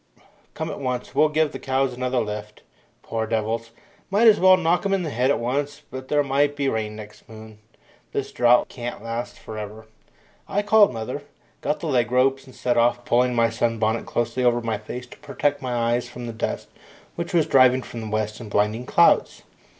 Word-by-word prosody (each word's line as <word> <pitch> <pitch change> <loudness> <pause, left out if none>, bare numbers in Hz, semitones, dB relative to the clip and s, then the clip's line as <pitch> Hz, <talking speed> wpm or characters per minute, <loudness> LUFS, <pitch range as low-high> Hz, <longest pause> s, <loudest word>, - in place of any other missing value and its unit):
Come 160 +1 -3
at - - -6
once; 125 -3 -3
we'll 155 - +4
give 155 -1 +1
the - - -7
cows 130 -1 0
another 125 0 -1
lift. 105 -1 -5 0.4
Poor 110 -1 -3
devils 115 +1 -2 0.4
might 210 +4 +4
as 215 -2 +6
well 185 0 +7
knock 175 0 +1
'em 195 -1 +1
on 190 - -2
the 155 - -3
head 125 +2 +1
at 140 - +3
once, 140 +4 -2
but 130 0 -7
there 145 +1 +2
might 140 +1 +1
be 140 -1 -1
rain 110 -3 -2
next 105 0 -12
moon. 110 -1 -12 0.5
This - - -3
drought 120 0 +4
can't 120 -3 -7
last 115 +1 -5
for 110 -1 -8
ever." 105 +1 -8 0.6
I 205 +1 0
called 210 0 +5
mother, 125 +4 -5 0.4
got 150 - -1
the 165 - -3
leg 125 -5 +1
ropes, 135 +2 +2
and 130 - -14
set 120 -1 0
off, 120 +1 +2
pulling 125 +1 +2
my 115 -1 +3
sun 115 0 0
bonnet 110 +1 0
closely 120 +2 -1
over 120 -1 +3
my 115 -2 -2
face 125 +4 -7
to 125 - -15
protect 145 0 -1
my 125 -2 -3
eyes 120 +1 0
from 120 0 -8
the 115 - -5
dust 110 - -4 0.5
which 170 0 -4
was 165 -4 +3
driving 130 -1 +4
from 115 - -8
the 110 - -6
west 110 +1 -2
in 110 - -8
blinding 105 +4 0
clouds. - - +3
125 Hz, 205 wpm, -23 LUFS, 115-140 Hz, 0.6 s, well